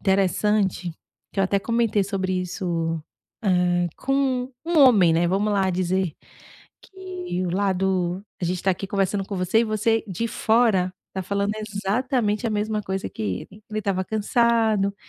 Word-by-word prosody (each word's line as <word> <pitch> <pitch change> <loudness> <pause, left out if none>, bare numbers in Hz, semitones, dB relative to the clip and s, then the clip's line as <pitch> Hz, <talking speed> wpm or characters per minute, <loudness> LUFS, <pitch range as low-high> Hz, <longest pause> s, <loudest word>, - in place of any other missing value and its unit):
interessante 195 -1 +1 0.4
que 195 - -1
eu - - +4
até 200 +1 +1
comentei 230 -1 +1
sobre 190 -2 -1
isso, 170 -3 -2 0.4
ah, 180 -3 +2
com 265 -2 0
um 335 -1 +1
homem, 215 - +7
né, 170 +2 +2
vamos 200 +4 +1
lá 195 -2 +2
dizer, 185 -2 0 0.7
que 365 - -5
o - - -2
lado 190 -1 0 0.2
a - - -1
gente 180 +1 -2
tá 190 - +3
aqui 190 +2 -3
conversando 195 0 0
com 200 - -4
você 185 +4 +2
e - - +2
você 225 +1 +1
de 195 +5 -2
fora 220 -5 +2 0.2
tá 190 - -3
falando 200 +2 -1
exatamente 215 +2 -1
a - - 0
mesma 215 0 -1
coisa 190 -1 -3
que - - -11
ele, 110 - -5
"ele 215 0 -3
estava 190 -2 -1
cansado", 220 -1 +2
200 Hz, 160 wpm, -24 LUFS, 185-220 Hz, 0.7 s, homem